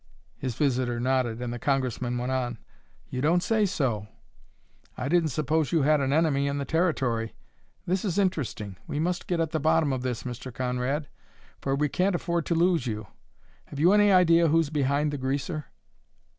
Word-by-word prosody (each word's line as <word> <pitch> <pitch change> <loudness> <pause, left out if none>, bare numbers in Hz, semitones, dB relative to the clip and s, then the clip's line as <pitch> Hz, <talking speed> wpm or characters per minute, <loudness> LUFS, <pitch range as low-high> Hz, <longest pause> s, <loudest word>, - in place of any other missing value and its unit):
His 130 -4 -4
visitor 125 -4 0
nodded 125 -2 0
and 120 -1 -3
the 120 - -5
Congressman 125 -2 -1
went 125 +2 -2
on: 125 -2 -1 0.5
"You 125 - -2
don't 170 +5 +3
say 220 -2 +2
so! 120 - -1 0.9
I 130 - -3
didn't 165 +1 +2
suppose 155 +2 0
you 165 -4 +3
had 150 0 +3
an 135 0 0
enemy 145 -2 +2
in 140 0 -1
the 140 - -2
Territory. 135 -10 0 0.5
This 185 +1 0
is 195 -4 -1
interesting! 140 - -1
We 145 - -3
must 175 +2 -1
get 175 -2 0
at 165 -2 0
the 160 - 0
bottom 160 -1 +2
of 130 - -2
this, 125 -2 -3
Mr. 125 +1 -6
Conrad, 125 +4 -2 0.5
for 135 0 -1
we 150 +2 +1
can't 185 +5 +1
afford 170 -1 -1
to 170 - +1
lose 170 -5 +2
you. 110 -1 -3 0.6
Have 140 - -9
you 175 +6 +5
any 205 -1 +5
idea 170 -2 +5
who's 160 -1 +2
behind 145 0 +1
the 145 - -3
greaser?" 140 +4 -2
145 Hz, 185 wpm, -27 LUFS, 125-165 Hz, 0.9 s, you